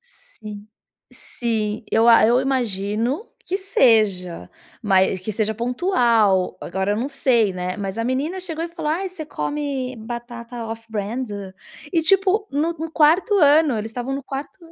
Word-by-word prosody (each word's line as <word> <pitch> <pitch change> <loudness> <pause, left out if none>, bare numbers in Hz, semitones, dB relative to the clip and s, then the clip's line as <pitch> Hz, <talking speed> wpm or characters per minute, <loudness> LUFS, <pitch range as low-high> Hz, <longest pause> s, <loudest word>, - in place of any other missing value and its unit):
Sim, 220 - -12 0.5
sim. 220 -3 -3
Eu 225 +1 +4
a 230 -2 +7
eu 240 +3 +4
imagino 240 - -1 0.2
que 375 - -1
seja, 215 - +2 0.3
mas 190 -3 +3
que 185 - -4
seja 215 +1 0
pontual, 235 - +2
agora 190 +3 -2
eu - - -1
não 235 +4 -1
sei, 245 -7 +2
né. 180 0 -4
Mas 195 -1 -4
a 230 - -1
menina 280 +9 -1
chegou 330 -3 -4
e - - -5
falou: 330 -3 -3
"Ai, 370 +5 -1
você 345 -4 -7
come 270 - -3
batata 235 +1 -7
off-brand?" 225 +2 -4 0.6
E, 330 -2 +2
tipo, 390 +4 +3
no 300 +4 0
no 325 -1 -6
4º 325 +7 +3
ano, 295 - +5
eles 215 +1 -4
estavam 245 +4 -4
no 275 - -4
4º 275 +4 -7
240 Hz, 155 wpm, -22 LUFS, 215-310 Hz, 0.6 s, a